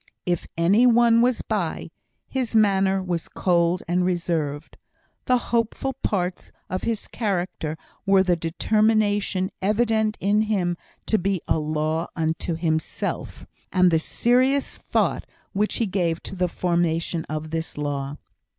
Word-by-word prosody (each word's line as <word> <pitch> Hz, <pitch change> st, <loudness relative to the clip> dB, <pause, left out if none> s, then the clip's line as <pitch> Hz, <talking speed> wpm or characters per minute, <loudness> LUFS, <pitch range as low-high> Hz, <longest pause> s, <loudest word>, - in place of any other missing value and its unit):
If 175 Hz, -2 st, -1 dB
any 200 Hz, +9 st, +5 dB
one 235 Hz, -1 st, +5 dB
was 245 Hz, 0 st, +2 dB
by, -, -, -2 dB, 0.4 s
his 255 Hz, -4 st, -2 dB
manner 195 Hz, -3 st, +3 dB
was 175 Hz, -3 st, -3 dB
cold 175 Hz, -1 st, +1 dB
and 180 Hz, +1 st, +1 dB
reserved. 165 Hz, -5 st, -2 dB, 0.5 s
The 255 Hz, -, +4 dB, 0.2 s
hopeful 235 Hz, +3 st, 0 dB
parts 185 Hz, -8 st, -2 dB, 0.2 s
of 185 Hz, -, -1 dB
his 225 Hz, -2 st, -2 dB
character 180 Hz, -7 st, -2 dB, 0.3 s
were 195 Hz, -1 st, +4 dB
the 180 Hz, -2 st, +2 dB
determination 205 Hz, +2 st, +1 dB
evident 220 Hz, +1 st, +1 dB
in 205 Hz, +2 st, +2 dB
him 195 Hz, -5 st, 0 dB, 0.3 s
to 220 Hz, -, +2 dB
be 195 Hz, 0 st, 0 dB
a -, -, +2 dB
"law 155 Hz, +2 st, -1 dB
unto 165 Hz, +1 st, -1 dB
himself," 160 Hz, -1 st, -3 dB, 0.3 s
and 185 Hz, -2 st, +4 dB
the 160 Hz, -, +3 dB
serious 255 Hz, -, +1 dB
thought -, -, -1 dB, 0.3 s
which 210 Hz, +2 st, 0 dB
he 230 Hz, -, +1 dB
gave 175 Hz, -4 st, -1 dB
to -, -, -6 dB
the 180 Hz, -1 st, +1 dB
formation 170 Hz, -1 st, 0 dB
of 155 Hz, 0 st, -5 dB
this 165 Hz, -1 st, -4 dB
law. 145 Hz, -1 st, -3 dB
185 Hz, 135 wpm, -24 LUFS, 165-215 Hz, 0.5 s, any